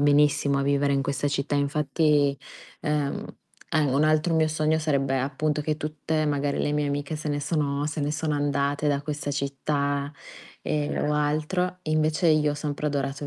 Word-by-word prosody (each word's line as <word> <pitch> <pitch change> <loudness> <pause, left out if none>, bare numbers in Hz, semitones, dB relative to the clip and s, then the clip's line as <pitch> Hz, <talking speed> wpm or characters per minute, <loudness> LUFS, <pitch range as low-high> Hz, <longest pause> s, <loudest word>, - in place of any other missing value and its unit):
benissimo 145 -1 +3
a - - +1
vivere 140 0 +2
in 135 - +1
questa 140 +1 -1
città 140 0 -1
infatti, 145 0 +2 0.4
ehm, 150 -3 -1 0.5
a 155 - +3
un 140 +1 +2
altro 155 +2 +3
mio 160 -1 +3
sogno 155 0 +1
sarebbe 135 -3 +1
appunto 145 +3 -1
che 155 0 -1
tutte 155 0 -2
magari 145 -1 0
le 145 - 0
mie 150 -1 0
amiche 145 +2 -2
se 155 0 -4
ne 145 0 0
sono 145 -1 -1
se 150 0 -3
ne 145 +1 0
sono 150 0 -1
andate 145 0 0
da 140 -1 +1
questa 145 0 -4
città, 140 0 -1 0.5
e 150 0 -1
o 150 0 0
altro, 155 +5 0
invece 155 +1 +1
io 155 -1 +4
ho - - -2
sempre 145 0 -3
adorato; 140 0 -2
145 Hz, 175 wpm, -26 LUFS, 140-155 Hz, 0.5 s, io